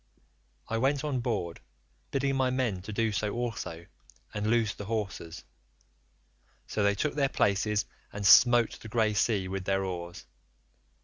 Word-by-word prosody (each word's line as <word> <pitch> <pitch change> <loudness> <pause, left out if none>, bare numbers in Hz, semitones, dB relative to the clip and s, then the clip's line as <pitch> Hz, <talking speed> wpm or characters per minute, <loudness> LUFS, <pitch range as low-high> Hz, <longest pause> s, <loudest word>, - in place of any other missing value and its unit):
"I 115 - -1
went 135 +3 +1
on 145 -4 -1
board, 105 -9 -2 0.5
bidding 135 0 0
my 130 -1 +2
men 125 -8 -1
to 100 - -7
do 110 +1 0
so 105 0 -2
also 115 -8 -4 0.5
and 105 0 -2
loose 110 -2 +2
the 105 - -8
hawsers; 100 -6 -4 1.2
so 105 - -2
they 100 0 +3
took 145 +9 -1
their 140 -2 +1
places 100 0 +1 0.3
and 100 0 -5
smote 120 +3 +6
the - - -10
grey 110 -1 +2
sea 100 -2 +1
with 95 0 -4
their 95 0 +1
oars. 85 -2 -6
105 Hz, 150 wpm, -29 LUFS, 100-120 Hz, 1.2 s, smote